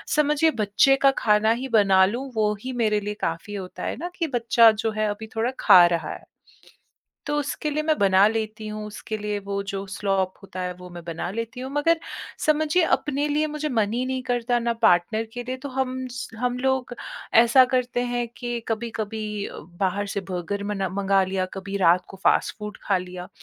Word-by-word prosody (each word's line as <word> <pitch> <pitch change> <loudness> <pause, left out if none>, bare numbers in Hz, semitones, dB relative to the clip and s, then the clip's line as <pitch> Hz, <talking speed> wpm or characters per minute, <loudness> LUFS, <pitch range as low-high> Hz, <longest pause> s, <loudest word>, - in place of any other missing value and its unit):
समझिए, 300 +1 +3
बच्चे 215 +7 +4
का - - +7
खाना 210 +1 +4
ही 265 - -3
बना 190 -2 +5
लूँ, 250 +6 -3
वो 210 -1 +2
ही 260 0 -5
मेरे 210 -1 +2
लिए 210 +1 -3
काफ़ी 170 +6 -4
होता 185 -2 -7
है - - -3
ना 350 +4 -4
कि 330 -2 -1
बच्चा 230 -1 +6
जो 220 +1 -2
है, 215 0 -1
अभी 215 +2 -5
थोड़ा 230 +3 0
खा 175 -1 +8
रहा 170 -1 -2
है। - - -11 1.0
तो 295 0 -1
उसके 295 +1 -2
लिए 305 +1 -1
मैं 310 -1 +1
बना 195 0 +5
लेती 220 0 -3
हूँ, 210 0 -5
उसके 210 +1 -6
लिए 210 0 -2
वो 200 0 -2
जो 195 0 -3
स्लॉप 195 -2 0
होता 185 -1 -8
है, 180 0 -2
वो 180 0 -11
मैं 170 - -7
बना 170 +1 -4
लेती 230 +4 -5
हूँ। 260 +1 -5
मगर 325 +3 +2 0.5
समझिए, 310 +3 +3
अपने 290 0 -2
लिए 300 +1 +1
मुझे 300 0 -3
मन 220 -5 0
ही 250 +2 -1
नहीं 260 0 -2
करता, 245 -1 0
ना 235 0 0
पार्टनर 215 +5 +3
के 245 - -4
लिए। 255 +1 -4
तो 280 - -4
हम 260 -1 -1
स 250 - -6
हम 250 +1 -1
लोग 265 -1 0 0.5
ऐसा 255 +2 +6
करते 250 -1 +1
हैं 240 -1 -1
कि 240 -1 -3
कभी-कभी 220 -1 -3 0.6
बाहर 195 +2 0
से 200 - -1
बर्गर 200 +3 -3
मना 195 -1 -1
मँगा 195 +1 +2
लिया, 185 0 -1
कभी 195 +1 -5
रात 180 0 +4
को - - -11
फ़ास्ट-फ़ूड 210 -1 +1
खा 195 -2 +1
लिया। 180 0 -8
220 Hz, 200 wpm, -24 LUFS, 200-255 Hz, 1.0 s, खा